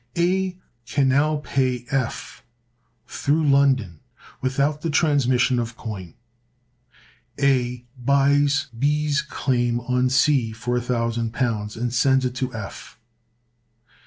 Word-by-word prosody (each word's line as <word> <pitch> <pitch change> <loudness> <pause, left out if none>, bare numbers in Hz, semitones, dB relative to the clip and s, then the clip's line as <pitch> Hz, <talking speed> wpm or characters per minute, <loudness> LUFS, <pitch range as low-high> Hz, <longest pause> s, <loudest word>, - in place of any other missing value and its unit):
A 185 +1 +1 0.3
can 135 +1 +1
now 145 +3 +2
pay 130 -4 -1
F 130 -4 -3 0.6
through 150 +4 0
London 135 - +2 0.4
without 140 +3 0
the 165 - -2
transmission 135 -5 +2
of 115 0 -4
coin. 95 -7 -7 1.2
A 125 -3 +1 0.2
buys 140 +2 +3
B's 150 +2 +1
claim 120 -5 -1
on 125 +1 +1
C 130 -3 +2
for 120 +2 -2
£1,000, 115 -2 -2
and 120 +1 -2
sends 130 +1 +3
it 125 - -2
to 130 0 -3
F. 110 -1 -9
130 Hz, 105 wpm, -23 LUFS, 120-145 Hz, 1.2 s, buys